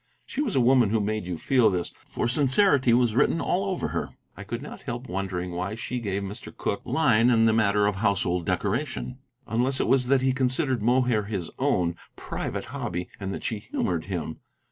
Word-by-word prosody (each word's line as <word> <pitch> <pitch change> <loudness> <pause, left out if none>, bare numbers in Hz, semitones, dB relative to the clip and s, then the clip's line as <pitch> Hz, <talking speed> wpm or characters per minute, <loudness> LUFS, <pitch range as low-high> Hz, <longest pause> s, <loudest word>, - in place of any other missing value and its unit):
She - - -3
was 250 -9 -1
a 130 - +4
woman 125 -2 +5
who 110 +1 +2
made 105 -2 -2
you 90 -2 -3
feel 125 +4 +3
this, 90 -2 -2
for - - -2
sincerity 135 +1 +3
was 120 -1 +3
written 135 +7 +3
all 190 +3 0
over 190 -2 -2
her. - - -3 0.3
I 95 - -8
could 115 +5 -5
not 150 - -9
help 120 0 -5
wondering 90 -1 -3
why 95 +4 -3
she 120 +2 -4
gave 100 -3 -2
Mr. 100 +2 -7
Cooke - - -2
line 120 -7 +3
in 115 -2 +4
the 110 - +4
matter 105 -2 +3
of 100 -1 0
household 95 -4 0
decoration, 110 - -2 0.3
unless 125 +5 0
it - - +1
was 125 0 +3
that 135 0 +3
he 130 -1 +3
considered 130 -1 0
Mohair 120 -2 +2
his 100 -5 -4
own, 85 -2 +1 0.2
private - - -4
hobby, 90 0 -4
and 95 -1 -4
that - - -5
she 110 - -2
humored 85 -5 -2
him. 85 -4 -4
110 Hz, 200 wpm, -26 LUFS, 95-130 Hz, 0.3 s, woman